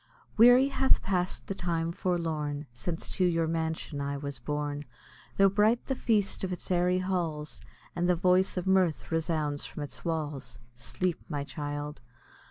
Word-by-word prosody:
Weary 245 +4 +7
hath 270 -1 +3
pass'd 180 -2 -1
the - - -3
time 170 -3 -1
forlorn, 160 -5 -2
Since 160 +8 -4
to 185 - +3
your 165 -2 +2
mansion 160 -2 -2
I 140 0 -2
was 140 -2 -5
borne, 145 +2 -3 0.5
Tho' 195 - +7
bright 210 +4 +3
the 270 - -1
feast 215 -7 +1
of 185 - -1
its 180 - -4
airy 180 0 +3
halls, 170 -5 -2 0.3
And 175 +1 +1
the 180 - +5
voice 185 +2 +3
of 180 - -1
mirth 185 -5 +2
resounds 155 -3 0
from 150 - -6
its 145 - -9
walls. 155 -4 -3 0.2
Sleep, 160 +9 -3
my 145 -3 -2
child! 145 0 -5
165 Hz, 160 wpm, -29 LUFS, 150-185 Hz, 0.5 s, Weary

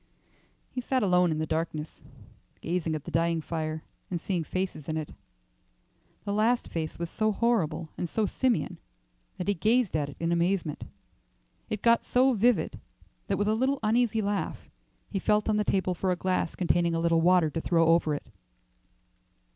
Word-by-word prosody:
He 250 - -3
sat 255 0 0
alone 180 -2 +4
in 155 - -1
the 155 - -1
darkness, 160 -1 -3 0.6
gazing 165 -2 -1
at 150 - -5
the - - -8
dying 165 0 +1
fire, 155 -1 -4 0.3
and 175 - -2
seeing 175 0 -2
faces 180 -3 -4
in 155 - -1
it. 155 -2 -5 1.1
The 200 - -1
last 225 +4 +2
face 160 -2 -4
was 170 - -3
so 215 +5 0
horrible 190 -9 0
and 175 - -2
so 220 +4 0
simian 225 -6 0 0.6
that 180 - -4
he 205 - +3
gazed 220 +1 +2
at 145 -2 0
it 145 - -11
in 165 0 0
amazement. 170 -2 0 0.9
It 215 -1 -3
got 230 0 +4
so 260 +1 +3
vivid 235 0 +2 0.5
that, - - 0
with 205 - 0
a 215 - +3
little 260 +5 +1
uneasy 225 0 +2
laugh, 200 0 -3 0.4
he 195 - -1
felt 210 +2 +2
on 215 -1 +2
the 210 - +2
table 190 -2 +1
for 185 +2 -2
a - - +2
glass 185 -2 -1
containing 175 -1 +1
a - - 0
little 165 0 +3
water 175 -2 +4
to 165 - -3
throw 165 -1 +3
over 165 -2 +3
it. - - -7
180 Hz, 180 wpm, -28 LUFS, 165-215 Hz, 1.1 s, alone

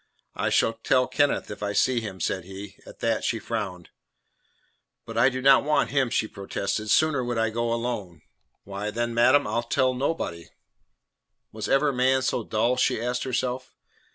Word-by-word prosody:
"I - - -1
shall 115 - +2
tell 125 +3 +2
Kenneth 145 -4 0
if 105 - -8
I 105 0 -2
see 125 +2 +2
him," 100 -4 -7
said 95 +2 -1
he. 95 +1 -9
At - - -13
that 115 -1 0
she 115 - 0
frowned. 100 -6 -5 1.2
"But 115 - -8
I 115 +3 +5
do 130 -1 -5
not 135 0 +6
want 150 +1 +1
him," 135 -3 +2
she 110 -2 0
protested. 100 +2 -4
"Sooner 150 0 +3
would 120 -1 -2
I 115 -1 +1
go 115 +1 -1
alone." 115 -7 -4 0.4
"Why, 100 +1 -5
then, 120 +2 -2
madam, 130 +5 +4
I'll 120 - 0
tell 130 +2 +1
nobody." 125 - -3 1.0
Was - - -5
ever 140 +1 +3
man 130 +1 +2
so 125 - 0
dull? 115 +4 0
she - - +1
asked 125 +2 -2
herself. 130 0 -3
120 Hz, 175 wpm, -25 LUFS, 105-130 Hz, 1.2 s, not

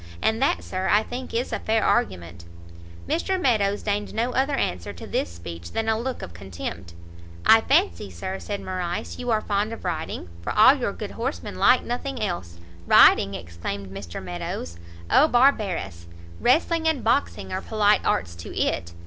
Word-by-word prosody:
And 220 - +1
that, 275 - +1
Sir, 185 0 -3
I 210 +1 +4
think 250 +2 -6
is 240 +2 -2
a - - -1
fair 220 0 +1
argument." 85 -3 -1 0.6
Mr 375 +3 0
Meadows 210 - +1
deigned 205 0 -2
no 235 +3 0
other 270 +3 +1
answer 90 - -2
to - - -10
this 85 - -2
speech 85 0 -9
than 225 0 -1
a 220 - +3
look 255 +2 -4
of 85 - -8
contempt. 85 -1 -7 0.5
"I 225 - +7
fancy, 85 - +1
Sir," 140 - -5
said 205 -1 -5
Morrice, 180 -2 -4
"you 245 - -4
are 220 -2 +2
fond 205 +2 -1
of 225 - -9
riding, 160 - -3
for - - -3
all - - +8
your - - -2
good - - -7
horsemen 85 +1 -4
like 250 - +5
nothing 260 +3 -4
else." 170 - -3 0.3
"Riding!" 100 0 +6
exclaimed 95 +3 -6
Mr 95 -2 -7
Meadows, 85 -1 -5 0.3
"Oh 300 - +6
barbarous! 205 - +1 0.3
Wrestling 320 +5 +2
and 315 -6 +1
boxing 235 -3 0
are 185 - -2
polite 210 -1 +2
arts 85 -1 0
to 85 - -8
it! 85 +1 -1
195 Hz, 175 wpm, -24 LUFS, -, 0.6 s, all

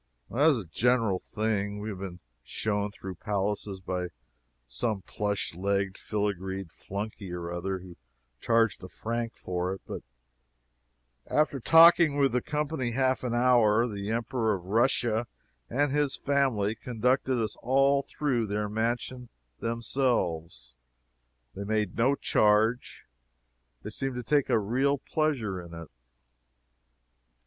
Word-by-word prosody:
As 145 +1 +5
a 105 - -5
general 115 +1 +2
thing, 105 -1 -2
we 105 +1 -4
have 100 -3 -6
been 95 -2 -7 0.2
shown 105 -1 -2
through 95 -2 -8
palaces 100 -1 -2
by 90 -1 -3 0.6
some 95 - -2
plush 105 -3 -2
legged 100 +2 -1
filagreed 95 -3 -3
flunkey 100 0 -6
or 85 -1 -5
other, 95 +2 -2
who 90 -1 -11 0.4
charged 115 - +2
a - - -6
franc 115 +4 -4
for 90 +1 -2
it; - - -14
but - - -6 1.3
after 150 -2 +1
talking 165 +1 +7
with 140 -1 +3
the 125 +1 +1
company 150 -5 -2
half 130 +1 +1
an 120 -2 -1
hour, 120 -2 +4
the 100 -2 -5
Emperor 115 -1 0
of 90 - -8
Russia 115 +1 +2 0.4
and 140 +3 +1
his 145 -1 +1
family 130 -8 +1
conducted 125 +2 0
us 110 -2 -1
all 135 +2 +3
through 130 -6 -1
their 105 +1 -1
mansion 120 +3 -2 0.3
themselves. 100 - -1 0.8
They 100 - -5
made 105 -2 -1
no 130 +5 +3
charge. 110 +1 +2 0.8
They 105 - -6
seemed 135 +3 -3
to 125 - -4
take 140 +4 +2
a 120 - +4
real 130 +7 +1
pleasure 130 - -1
in 85 -1 -10
it. 85 -1 -9
110 Hz, 130 wpm, -28 LUFS, 100-125 Hz, 1.3 s, talking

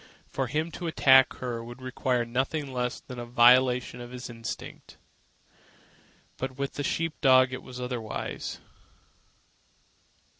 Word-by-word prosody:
For 135 -1 -3
him 155 +6 -2
to 175 - -5
attack 135 -4 +6
her 120 -2 -5
would 120 +2 -10
require 130 -1 -1
nothing 135 +4 -2
less 125 -1 -2
than 125 -1 -9
a 120 - -5
violation 125 +1 +4
of 120 - -8
his 125 0 -7
instinct. 115 -1 -8 1.4
But 130 0 -5
with 140 0 -3
the 145 - -4
sheep 165 +3 -2
dog 130 -2 +5
it 130 - -5
was 125 0 -10
otherwise. 125 -3 -4
125 Hz, 135 wpm, -28 LUFS, 120-135 Hz, 1.4 s, attack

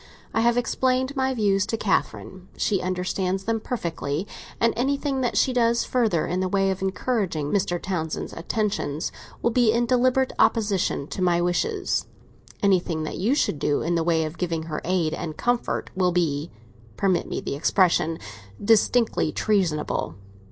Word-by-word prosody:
I 225 - +2
have 235 +1 +3
explained 260 +2 0
my 265 -1 0
views 200 -4 +2
to 225 - -1
Catherine; 190 -2 -2
she 195 -3 +1
understands 185 +1 -1
them 225 +2 0
perfectly, 170 - -3 0.3
and 230 0 +3
anything 275 +2 0
that 245 - 0
she 260 - +3
does 235 -1 +2
further 225 -10 +1
in 180 +2 -1
the 185 - 0
way 195 0 +2
of 190 - -4
encouraging 190 - -1
Mr. 180 -3 0
Townsend's 165 -4 -3
attentions 170 -5 -2 0.3
will 235 - +3
be 235 -2 +4
in 235 +1 +2
deliberate 255 +1 +2
opposition 205 - +2
to - - -5
my 175 -1 +3
wishes. 375 - 0 0.6
Anything 180 -5 +2
that 155 - -5
you 225 +9 +2
should 160 - 0
do 145 0 +1
in 170 - 0
the 165 -1 +1
way 160 -1 +2
of 155 +2 -7
giving 165 -3 -1
her 160 -1 -4
aid 170 -3 0
and 155 -1 -5
comfort 245 0 -1
will 180 -1 +2
be—permit 140 - -2
me - - -2
the - - -4
expression—distinctly 165 - +1
treasonable. 175 - 0
190 Hz, 155 wpm, -24 LUFS, 165-230 Hz, 0.6 s, be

